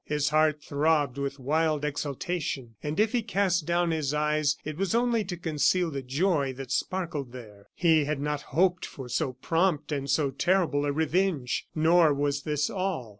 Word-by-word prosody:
His 150 Hz, 0 st, 0 dB
heart 155 Hz, -1 st, +2 dB
throbbed 145 Hz, -2 st, +1 dB
with 140 Hz, 0 st, -3 dB
wild 150 Hz, +2 st, 0 dB
exultation; 145 Hz, -3 st, -3 dB
and 150 Hz, +4 st, -3 dB
if 215 Hz, 0 st, +3 dB
he 245 Hz, -, +1 dB
cast 195 Hz, -6 st, 0 dB
down 175 Hz, 0 st, +1 dB
his 150 Hz, -3 st, -1 dB
eyes, 150 Hz, -1 st, +1 dB
it 155 Hz, 0 st, -4 dB
was 195 Hz, +4 st, -1 dB
only 235 Hz, -2 st, +2 dB
to 180 Hz, -1 st, -5 dB
conceal 170 Hz, +1 st, +1 dB
the 140 Hz, -2 st, -4 dB
joy 140 Hz, +1 st, 0 dB
that 130 Hz, 0 st, -8 dB
sparkled 150 Hz, -5 st, -2 dB
there. 105 Hz, -5 st, -12 dB
He 160 Hz, -4 st, +3 dB
had 150 Hz, -1 st, -2 dB
not 150 Hz, 0 st, -2 dB, 0.2 s
hoped 180 Hz, 0 st, +3 dB
for 135 Hz, -3 st, -7 dB
so 130 Hz, +2 st, -1 dB
prompt 160 Hz, +3 st, 0 dB
and 140 Hz, -1 st, -2 dB
so 140 Hz, 0 st, +2 dB
terrible 155 Hz, -1 st, +1 dB
a -, -, +1 dB
revenge. 160 Hz, -3 st, 0 dB
Nor 160 Hz, -1 st, +4 dB
was 145 Hz, 0 st, 0 dB
this 150 Hz, 0 st, -1 dB
all. 185 Hz, -, -3 dB
150 Hz, 175 wpm, -27 LUFS, 140-175 Hz, 0.2 s, Nor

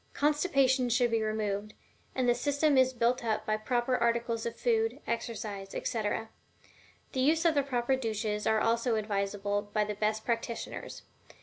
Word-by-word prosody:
Constipation 275 Hz, -4 st, +2 dB
should 240 Hz, 0 st, +2 dB
be 225 Hz, -1 st, +2 dB
removed, 215 Hz, -1 st, -2 dB, 0.4 s
and 255 Hz, -1 st, +1 dB
the 240 Hz, -, +5 dB
system 285 Hz, +4 st, +1 dB
is 260 Hz, 0 st, +5 dB
built 245 Hz, 0 st, +1 dB
up 215 Hz, -1 st, -1 dB
by 215 Hz, -, +1 dB
the 215 Hz, -, -7 dB
proper 245 Hz, +2 st, +1 dB
articles 235 Hz, -1 st, 0 dB
of 230 Hz, -, -5 dB
food, 230 Hz, +2 st, +1 dB
exercise, 215 Hz, -4 st, -4 dB
etc. 220 Hz, 0 st, -2 dB, 0.8 s
The 260 Hz, -, -2 dB
use 315 Hz, +6 st, +3 dB
of 330 Hz, -, +5 dB
the 285 Hz, -, +3 dB
proper 265 Hz, -1 st, 0 dB
douches 215 Hz, -4 st, -2 dB
are 220 Hz, 0 st, +3 dB
also 230 Hz, +1 st, +1 dB
advised 205 Hz, -2 st, -1 dB
by 205 Hz, +1 st, 0 dB
the 210 Hz, 0 st, -3 dB
best 215 Hz, +1 st, -1 dB
practitioners. 235 Hz, 0 st, -4 dB
230 Hz, 165 wpm, -30 LUFS, 215-255 Hz, 0.8 s, the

